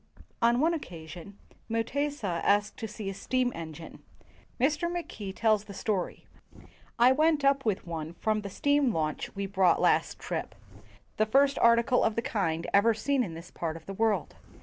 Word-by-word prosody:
"] - - -37
On 240 +1 +2
one 325 +4 +3
occasion, 175 - -8 0.3
Mutesa 230 -4 -1
asked 205 +1 +2
to 225 - -4
see 210 -1 -7
a 195 - -2
steam 250 +5 0
engine. 160 0 -9 0.6
Mr. 305 +6 +1
Mackay 275 - -5
tells 215 0 +1
the 200 - -10
story: 200 -5 -2 0.7
"I 245 +2 +6
went 305 +1 +2
up 275 0 +4
w 220 -7 0
T - - -19
ith - - -26
one 165 -1 -5
from 215 +2 0
the 200 - -6
steam 285 +5 +2
launch 155 -1 -3
we 200 0 -2
brought 190 -2 +3
last - - +2
trip - - -5 0.3
— - - -28
the 215 - +2
first 275 +4 +3
article 235 +2 +4
of 220 - +1
the 230 - -1
kind 165 -7 -1
ever 220 +3 +5
in 250 -12 +1
this 170 +2 -10
part 165 -1 -4
of - - -15
the 195 - -6
world. 210 -4 0
215 Hz, 185 wpm, -29 LUFS, 185-255 Hz, 0.7 s, I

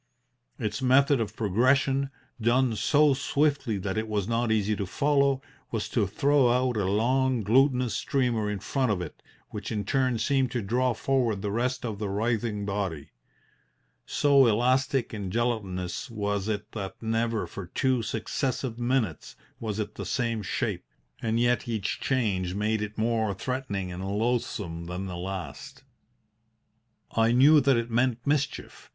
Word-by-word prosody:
Its 105 +1 -3
method 135 +1 +4
of 105 -1 -4
progression 130 +6 +2 0.3
done 120 +1 +2
so 145 +5 +4
swiftly 140 -4 0
that 95 +2 -2
it 110 - -3
was 105 -3 -1
not 115 0 0
easy 105 -1 +1
to 100 -2 -3
follow 140 +2 +2 0.3
was 110 -3 -2
to 105 -4 0
throw 135 +6 +3
out 125 0 +2
a 105 -3 0
long, 125 +4 +1
glutinous 125 +2 +3
streamer 120 -6 0
in 105 - -2
front 125 +5 0
of 100 - 0
it, 90 -4 -7 0.3
which 105 +1 -6
in 105 -3 -2
turn 130 0 +1
seemed 135 +1 +1
to 125 0 -2
draw 125 +4 +1
forward 120 -7 0
the 100 - -1
rest 125 +3 -1
of 110 -4 -4
the 105 -2 -2
writhing 110 0 -1
body. 100 -7 -3 1.0
So 140 -3 +4
elastic 125 +3 +1
and 100 -4 -4
gelatinous 100 -3 -2
was 105 -2 -2
it 105 -1 -3
that 100 -3 -6
never 115 0 0
for 95 -3 -8
two 130 +6 +1
successive 120 +2 -2
minutes 120 - -1 0.2
was 110 -3 -3
it 105 - -3
the - - -6
same 115 -3 -1
shape, 100 - -2 0.4
and 115 0 0
yet 120 0 +2
each 110 -3 -2
change 95 -9 0
made 105 +1 0
it 105 0 -5
more 110 -2 0
threatening 100 -6 -3
and 90 +1 -6
loathsome 100 -5 -2
than 90 +2 -4
the 90 -2 -5
last. 90 -6 -6 1.3
"I 115 0 +3
knew 145 +5 +7
that 135 -2 +3
it 115 0 -2
meant 120 0 +1
mischief. 145 0 -2
115 Hz, 155 wpm, -27 LUFS, 105-130 Hz, 1.3 s, knew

